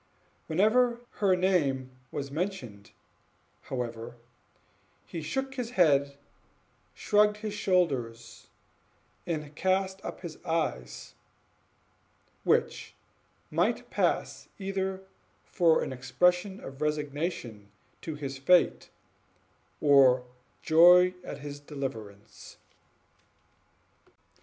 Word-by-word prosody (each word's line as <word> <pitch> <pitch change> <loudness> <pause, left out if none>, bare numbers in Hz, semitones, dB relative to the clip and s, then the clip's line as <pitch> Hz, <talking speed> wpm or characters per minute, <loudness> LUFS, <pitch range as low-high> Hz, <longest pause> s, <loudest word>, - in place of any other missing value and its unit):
Whenever 235 +8 +2 0.2
her 195 -3 +4
name 145 -9 +1 0.2
was 140 -1 -5
mentioned, 140 - -5 0.7
however, 120 -2 -5 0.9
he 160 +10 -6
shook 265 - -3
his 250 -3 -4
head, 140 -5 +3 0.8
shrugged 210 0 +3
his 210 -1 -5
shoulders, 130 - -1 0.8
and 150 -3 -4
cast 190 +1 0
up - - -7
his 170 -3 -9
eyes, 160 - -3 1.3
which - - 0 0.6
might - - 0
pass - - -1
either 190 -1 -3 0.4
for 165 -3 +3
an - - -4
expression 180 +10 +1
of 135 +2 -10
resignation 145 - -3 0.3
to 160 - -5
his 135 -2 -6
fate, 180 +6 +3 0.9
or 135 -4 +5 0.4
joy 180 +3 +7
at 145 - -8
his 145 0 -7
deliverance. 115 -8 -8
155 Hz, 85 wpm, -29 LUFS, 135-190 Hz, 1.3 s, joy